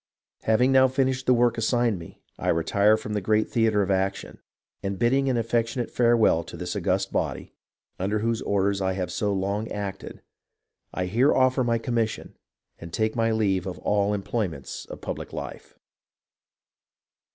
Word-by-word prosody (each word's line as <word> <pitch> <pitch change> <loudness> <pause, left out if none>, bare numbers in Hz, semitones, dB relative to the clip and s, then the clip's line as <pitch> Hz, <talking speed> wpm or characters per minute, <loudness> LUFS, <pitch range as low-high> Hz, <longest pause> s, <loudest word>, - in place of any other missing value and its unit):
Hav 110 +2 +3
ing 130 - +4
now 130 0 +6
finished 130 0 0
the 125 - +6
work 120 -1 +2
assigned 115 -3 +1
me, 80 - -13 0.2
I - - -4
retire 100 +6 +3
from 105 - -6
the 105 - -1
great 110 +2 +1
theatre 110 -3 +2
of 100 - -1
action, 95 +1 -2 0.4
and, 100 0 -3
bidding 135 +4 +2
an 125 - +1
affectionate 115 +1 -1
fare 120 -1 +3
well 85 -7 +3
to - - -9
this - - -4
august - - 0
body, - - -2 0.5
under 100 +3 0
whose 115 +1 -1
orders 100 0 0
I 95 0 0
have 90 -2 -3
so 100 +3 -1
long 100 +3 -2
acted, 100 -2 -6 0.7
I 90 - -2
here 120 +10 +3
offer 130 0 +3
my 115 -1 +1
commission 115 -1 -2 0.4
and 85 0 -9
take 110 +3 0
my 115 -1 +2
leave 100 -4 +1
of 90 - -5
all 100 -1 +1
the 105 - +1
employments 95 - -4
of - - -10
public - - -6
life." - - -8
110 Hz, 175 wpm, -25 LUFS, 100-120 Hz, 0.7 s, now